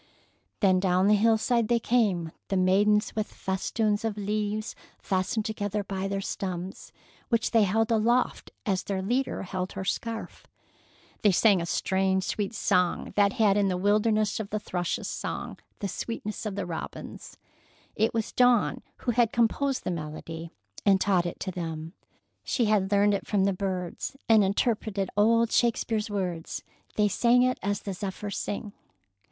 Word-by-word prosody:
Then 190 -3 +4
down 185 0 +2
the 210 - +6
hillside 225 +2 +3
they 240 +1 +3
came, 205 -9 +1 0.2
the 195 - 0
maidens 205 +4 +3
with 215 -1 -2
festoons 205 +3 -1
of 220 -2 -2
leaves 210 +1 -2 0.2
fastened 195 +3 -1
together 205 -1 -2
by 195 0 -3
their 195 0 -2
stems, 185 -1 -5 0.4
which 230 -2 +1
they 225 -3 +5
held 225 +4 +1
aloft 235 +3 +1 0.2
as 190 -3 +1
their 190 -2 -3
leader 250 +4 -1
held 185 0 -4
her 190 0 -5
scarf. 225 +3 -4 0.7
They 205 - +5
sang 195 0 +4
a 170 - -3
strange, 190 +1 +1
sweet 205 +3 -2
song 180 -4 +1
that 200 -1 +4
had 210 -3 +3
in 200 -1 +3
it - - +1
the 180 - 0
wildness 210 +2 +2
of 210 -2 -4
the 215 - -1
thrush's 180 -4 -3
song, - - -5 0.2
the 200 - -1
sweetness 215 +2 -4
of 200 - -4
the 200 -2 -2
robin's. 170 -2 -7 0.6
It 220 +1 +2
was 225 -2 -2
Dawn 245 -3 +3 0.2
who 245 - 0
had 235 -1 +3
composed 255 +4 +1
the - - -2
melody, 165 +1 -6 0.3
and 195 -2 +4
taught 185 -3 +2
it 175 - -6
to 190 - -2
them. 165 -2 -5 0.5
She 240 - +1
had 205 -2 +2
learned 205 0 +4
it 200 - -2
from 200 -2 +2
the 195 0 +2
birds, 185 +5 -4
and 220 -2 +6
interpreted 200 -1 0
old 230 +2 +4
Shakespeare's 225 -2 +1
words. 180 -5 -3 0.3
They 210 -1 +3
sang 240 +4 +4
it 255 0 +1
as 200 0 -1
the 200 - -3
zephyrs 200 +1 -4
sing. 205 0 -4
205 Hz, 165 wpm, -27 LUFS, 190-220 Hz, 0.7 s, the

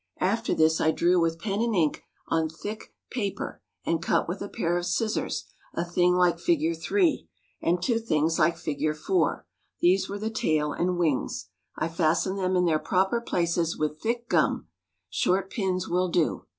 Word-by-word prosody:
After 225 +5 +1
this 160 0 +3
I 160 - +4
drew 175 +2 +3
with 165 0 +1
pen 200 +4 -2
and 230 -2 +1
ink 160 -5 +1 0.3
on 160 -1 +1
thick 205 +7 -7 0.2
paper, 205 -6 -3 0.2
and 165 -1 0
cut 170 - +1
with 175 +4 -4
a 200 - -4
pair 170 +1 -1
of 175 0 -1
scissors, 215 +4 -1 0.3
a 170 - -1
thing 175 +1 +2
like 175 -2 +3
Fig. 165 -1 +1
3, 345 - +1 0.3
and 175 +2 +2
two 230 +5 +1
things 160 -7 +1
like 165 +1 +3
Fig. 155 -1 -1
4; 360 - 0 0.3
these 190 +2 +3
were 200 - -3
the 215 +2 -3
tail 150 -7 0
and 180 +1 0
wings. 160 -6 -1 0.3
I - - 0
fastened 170 +4 +1
them 185 0 +1
in 180 0 +3
their 160 -2 +2
proper 190 +8 +1
places 170 -5 0
with 155 0 -2
thick 235 +1 -1
gum - - +2 0.5
(short 190 +1 +1
pins 190 -5 -1
will 180 +1 +1
do). 170 -2 0
175 Hz, 175 wpm, -27 LUFS, 165-195 Hz, 0.5 s, I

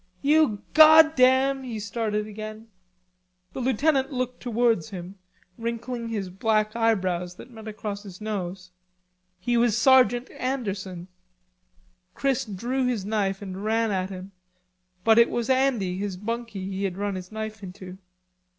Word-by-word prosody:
"You 295 -8 +3
goddam..." 275 -4 +6
he 235 -4 -5
started 210 0 -2
again. 215 +1 -8 0.8
The - - -5
lieutenant 265 +2 +1
looked 250 -1 -3
towards 230 -7 +1
him, 190 0 -8 0.4
wrinkling 235 +1 -4
his 200 -5 -3
black 215 +2 0
eyebrows 185 -6 0
that 250 - -13
met 220 -2 -11
across 210 -1 -5
his 195 -3 -11
nose. 190 -4 -5 0.7
He 240 +6 0
was 235 -2 +3
Sergeant 250 0 +4
Anderson. 195 -9 -4 1.1
Chris 270 -1 0
drew 240 +6 -2
his 230 -6 -1
knife 205 -2 -1
and 190 0 -6
ran 225 0 +1
at 185 -1 -1
him, 190 0 -8 0.7
but 225 0 +6
it 235 - +6
was 240 +1 -1
Andy 240 -9 +1
his 200 -2 -3
bunkie 230 -1 -4
he 195 0 -3
had 185 -1 -3
run 205 0 -2
his 185 0 -7
knife 220 -1 -6
into. 185 0 -9
220 Hz, 140 wpm, -25 LUFS, 195-245 Hz, 1.1 s, goddam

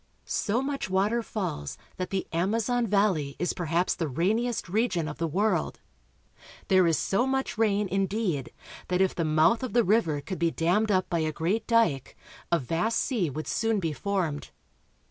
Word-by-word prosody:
So 230 +5 0
much 275 -7 -3
water 200 +5 +1
falls 185 - -4 0.2
that 185 - -3
the 195 -1 -2
Amazon 225 +7 +1
valley 190 -9 +1
is 180 - -1
perhaps 175 +1 0
the 165 - -2
rainiest 215 - 0
region 190 -4 0
of 150 - -7
the 165 - 0
world. 200 +7 0 0.9
There 185 -3 +5
is 165 -3 +2
so 215 - +1
much 265 0 -1
rain, 210 -2 +1
indeed, 190 - -1 0.4
that 180 0 0
if 190 -1 +3
the 170 - -1
mouth 155 +7 +3
of 255 - -4
the 240 0 +4
river 180 -8 +2
could 185 +6 -6
be 170 0 +2
dammed 180 +7 +1
up 185 -2 +2
by 170 - -1
a 155 -1 0
great 180 +8 -1
dike 225 - +1 0.3
a 170 - +5
vast 165 - -1
sea 220 - 0
would 155 +3 -5
soon 225 -1 0
be 165 -4 -2
formed. 170 -2 -2
190 Hz, 175 wpm, -27 LUFS, 165-220 Hz, 0.9 s, There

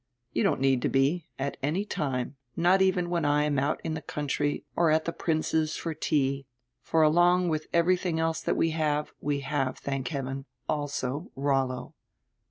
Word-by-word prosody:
"You 115 - +1
don't - - +2
need 135 -2 +3
to - - +1
be, 140 +5 +1
at 140 +1 -3
any 165 +9 0
time, 135 -7 -2 0.2
not 180 +3 +4
even 180 -2 +2
when 170 -2 +1
I 145 0 +3
am 145 -2 +1
out 145 +3 0
in 160 - -2
the 155 - -4
country 145 -1 -2
or 170 -1 +3
at 155 +1 +3
the 170 - -2
Prince's 155 -1 0
for 165 - -3
tea, 140 -3 0 0.3
for 160 -1 +2
along 175 +3 +4
with 155 -1 -2
everything 175 0 +2
else 160 0 0
that - - 0
we 165 - +2
have, 150 -2 0
we 145 -1 -1
have, 140 -2 -1
thank 135 -2 -3
heaven, 135 -2 -4 0.2
also 145 +1 -2
Rollo." 135 -2 0
150 Hz, 180 wpm, -28 LUFS, 135-165 Hz, 0.3 s, not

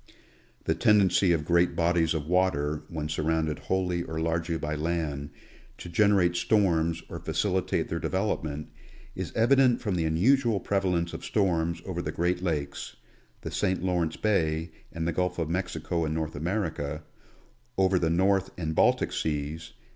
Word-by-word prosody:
The - - +1
tendency 100 -3 +4
of 80 -3 +1
great 85 +1 +3
bodies 85 -1 +2
of 75 -2 -2
water, 75 -4 +1
when 75 -2 -4
surrounded 80 0 -1
wholly 90 -2 -1
or 80 -2 -4
largely 80 +1 -1
by 75 -1 -3
land, 75 -2 -2 0.5
to 85 - -8
generate 95 -1 +3
storms 85 -4 +2
or - - -7
facilitate 95 -3 0
their 85 - -3
develop 95 +2 -1
ment, 75 0 -5 0.5
is - - -4
evident 125 +1 +4
from 105 -5 -2
the 85 -2 0
unusual 110 +7 +3
prevalence 90 -4 0
of - - -7
storms 85 -5 0
over 90 -2 -3
the - - -3
great 90 +1 0
lakes, 80 -6 -3 0.5
the - - -6
St. 95 -1 0
Lawrence 85 -4 0
bay 80 -6 0 0.2
and 80 0 -3
the 85 - 0
Gulf 90 +1 -1
of 80 -2 -2
Mexico 85 -2 -2
in 80 0 -1
North 80 -1 -3
America; 80 -3 -2 0.7
over 95 -1 +3
the 80 - +1
North 95 +3 +2
and 80 -3 -2
Baltic - - +2
seas. 75 +1 -3
85 Hz, 155 wpm, -28 LUFS, 80-95 Hz, 0.7 s, tendency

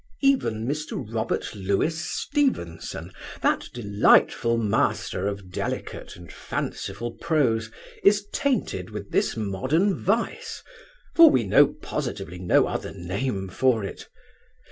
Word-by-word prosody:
'Even 185 - +2
Mr. 150 +2 -3 0.2
Robert 110 -1 -2
Louis 100 - 0
Stevenson, 170 - -2 0.3
that - - +1
delightful 115 +1 +3
master 100 -3 0
of 100 -2 -5
delicate - - -4
and 85 -1 -12
fanciful 110 +5 -4
prose, 125 -10 +1 0.3
is 205 0 +4
tainted 265 - -1
with 105 -2 -7
this - - +1
modern 130 - +1
vice, 445 - -2 0.5
for 330 -1 +9
we 125 - +3
know 100 - +6 0.2
positively 90 +2 -4
no 90 -1 +4
other - - -4
name 95 +3 -3
for 115 +3 +1
it. 100 - -7
115 Hz, 115 wpm, -25 LUFS, -, 0.5 s, for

